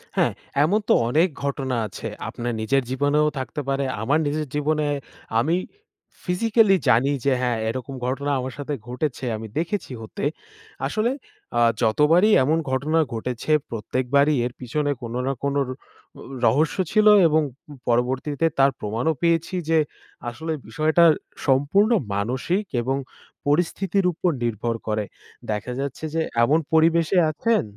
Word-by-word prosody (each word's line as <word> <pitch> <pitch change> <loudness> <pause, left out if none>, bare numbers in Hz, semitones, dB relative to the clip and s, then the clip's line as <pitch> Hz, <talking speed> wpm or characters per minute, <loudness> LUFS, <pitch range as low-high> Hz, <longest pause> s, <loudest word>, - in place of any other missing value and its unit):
হ্যাঁ, - - +3 0.3
এমন 195 +8 +3
তো - - +7 0.2
অনেক 160 +8 +4 0.2
ঘটনা 135 -2 -1
আছে। 95 - -7 0.2
আপনার 120 0 -4
নিজের 135 +5 +1
জীবনেও 145 +3 +2
থাকতে 130 +3 -4
পারে। 135 0 0 0.2
আমার 145 +7 +2
নিজের 150 +1 -2
জীবনে 150 +1 +1 0.5
আমি 160 +8 +2 0.7
ফিজিক্যালি 210 +2 +3
জানি 125 +3 +4 0.2
যে 140 - +4
হ্যাঁ, 120 -2 0
এরকম 130 +3 -5
ঘটনা 140 +3 -1
আমার 130 -1 -4
সাথে 145 +1 -4
ঘটেছে, 130 +2 -3
আমি 110 +1 -7
দেখেছি 175 0 -2
হতে। 110 - -7 0.6
আসলে 220 +3 0 0.5
আ - - +4 0.2
যতবারই 150 - +4
এমন 155 +5 +2
ঘটনা 150 +5 +1
ঘটেছে, 120 +5 -3 0.2
প্রত্যেকবারই 130 +6 +1
এর 125 - -4
পিছনে 145 +4 -1
কোনো 120 0 -5
না 135 - +1
কোনো 140 0 +1
র - - -7 0.5
উ - - -10 0.2
রহস্য 150 +9 +2
ছিল 215 0 +4 0.2
এবং 155 0 +3 0.3
উম 145 - -10
পরবর্তীতে 130 +6 0
তার 135 +1 +5
প্রমাণও 115 +9 -1
পেয়েছি 170 +1 +1
যে 165 - +4 0.5
আসলে 160 +7 -5 0.2
বিষয়টা 155 +7 +2 0.4
সম্পূর্ণ 145 - +3 0.2
মানসিক 130 - -1 0.2
এবং 135 +3 -1 0.5
পরিস্থিতির 180 +5 +1
উপর 180 +2 0
নির্ভর 115 0 -1
করে। 105 -1 0 0.5
দেখা 105 +4 -3
যাচ্ছে 140 +2 -4
যে 165 - +2 0.2
এমন 150 +7 +4
পরিবেশে 165 +3 +4
আছেন 230 +8 +1
145 Hz, 140 wpm, -23 LUFS, 125-160 Hz, 0.7 s, তো